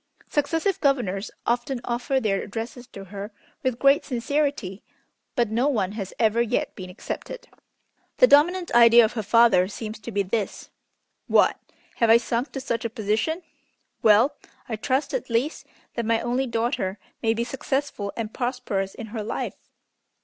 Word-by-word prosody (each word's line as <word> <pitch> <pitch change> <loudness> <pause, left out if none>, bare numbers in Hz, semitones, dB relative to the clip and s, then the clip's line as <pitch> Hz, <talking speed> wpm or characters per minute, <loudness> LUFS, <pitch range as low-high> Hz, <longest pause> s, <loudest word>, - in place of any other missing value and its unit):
Successive 325 +6 0
governors 225 -9 +1 0.2
often 240 +2 0
offer 245 +3 0
their 200 -5 0
addresses 235 +3 -6
to 195 - -10
her 200 +2 -7 0.3
with 255 -2 -1
great 275 +2 +4
sincerity, 255 -6 -1 0.5
but 235 -4 +1
no 240 +5 +2
one 210 -9 0
has 200 -3 -5
ever 225 0 +3
yet 240 +1 -1
been 185 -2 -8
accepted. 460 - -7 0.7
The - - +8
dominant 350 +1 +4
idea 235 0 +8
of 215 - -3
her 230 - -2
father 210 -3 +5
seems 215 +2 -6
to 220 +2 -7
be 200 -1 +1
this: 200 +2 -3 0.6
'What, - - +4 0.4
have 230 - +3
I 225 - +9
sunk 235 +3 -2
to 270 - -3
such 235 -3 -2
a 230 - -1
position! 225 - -1 0.6
Well, 225 +7 +5 0.3
I 230 - -2
trust, 260 +6 -1
at - - -3
least, 235 +7 -1 0.3
that 235 -2 -3
my 230 0 +3
only 250 +3 -1
daughter 225 -4 -1 0.2
may 225 0 +2
be 230 - 0
successful 265 -4 -3
and 225 -2 -4
prosperous 240 -6 -2
in 230 - -7
her 220 - -3
life!' 210 - -5
235 Hz, 160 wpm, -25 LUFS, 215-265 Hz, 0.7 s, I